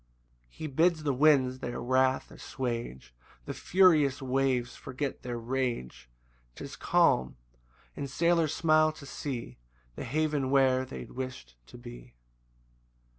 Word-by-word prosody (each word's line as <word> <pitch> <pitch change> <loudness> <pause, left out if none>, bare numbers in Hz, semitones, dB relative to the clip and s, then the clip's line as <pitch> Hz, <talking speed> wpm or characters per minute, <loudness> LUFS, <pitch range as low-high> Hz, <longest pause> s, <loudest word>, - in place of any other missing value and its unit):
5 - - -26
He - - -5
bids 160 +3 +2
the 145 -2 +1
winds 130 -2 +3
their 120 -1 -4
wrath 130 +1 +1
assuage; 120 - -5 0.3
The - - -4
furious 160 -7 +4
waves 130 -2 0
forget 135 +2 -5
their 120 -1 -4
rage; 115 - -3 0.5
'Tis - - -8
calm; 65 0 +2 0.6
and 140 -1 -5
sailors 170 +1 +2
smile 155 -1 +3
to 150 - -12
see 135 - -6 0.4
The - - -6
haven 150 -3 0
where 130 -1 +3
they 130 - -7
wish'd 130 - -7
to - - -12
be. - - -12
130 Hz, 125 wpm, -29 LUFS, 120-150 Hz, 0.6 s, furious